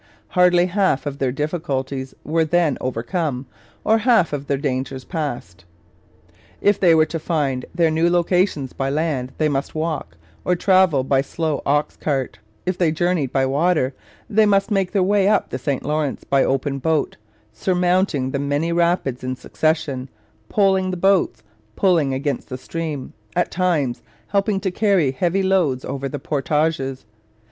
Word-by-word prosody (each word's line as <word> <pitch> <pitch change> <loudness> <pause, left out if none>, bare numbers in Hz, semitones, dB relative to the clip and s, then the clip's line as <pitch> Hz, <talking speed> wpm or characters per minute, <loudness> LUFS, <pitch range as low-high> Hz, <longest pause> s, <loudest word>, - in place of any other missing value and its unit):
Hardly 180 +2 +4
half 185 -7 +1
of 140 -1 -4
their 130 -2 +1
difficulties 135 -3 -3
were 165 +2 +1
then 160 -2 +2
overcome 130 +2 -2 0.4
or 220 +1 +3
half 220 -8 +3
of 140 -1 -4
their 140 - +1
dangers 130 -1 -3
passed. 120 - -5 1.0
If 205 0 +2
they 170 -4 +5
were 155 -1 +5
to 165 - -4
find 145 -6 -1
their 165 -2 +3
new 165 +2 +2
locations 175 -5 +1
by 135 0 -2
land, 140 -4 -1
they 155 - +2
must 140 0 -2
walk 155 - -3 0.3
or 180 - +2
travel 185 -7 +3
by 135 0 +2
slow 155 +1 -2
ox 145 +2 +1
cart; 135 -4 -2 0.3
if 185 0 -2
they 170 -3 +3
journeyed 160 -4 0
by 135 -1 +2
water, 145 0 +1 0.3
they 215 0 +3
must 200 +1 +2
make 195 -3 +1
their 195 -3 +2
way 200 0 +3
up 210 0 +2
the 130 - -3
St 135 +1 -2
Lawrence 150 -1 -1
by 135 -1 +2
open 135 +1 -1
boat, 155 +2 0 0.4
surmounting 180 - +1
the 140 - -2
many 145 +4 -1
rapids 170 -7 0
in 130 0 -2
succession, 140 -3 -1 0.4
poling 190 -3 +2
the 185 - -3
boats, 180 - +2 0.3
pulling 170 -8 +2
against 140 +2 -2
the 130 - -4
stream, 155 -1 -5 0.2
at - - +1
times 165 -9 0 0.3
helping 200 0 +1
to 190 - -1
carry 190 -8 +2
heavy 175 +8 0
loads 175 -9 +1
over 140 0 -4
the 145 - -4
portages. 145 -2 -1
155 Hz, 160 wpm, -21 LUFS, 135-180 Hz, 1.0 s, they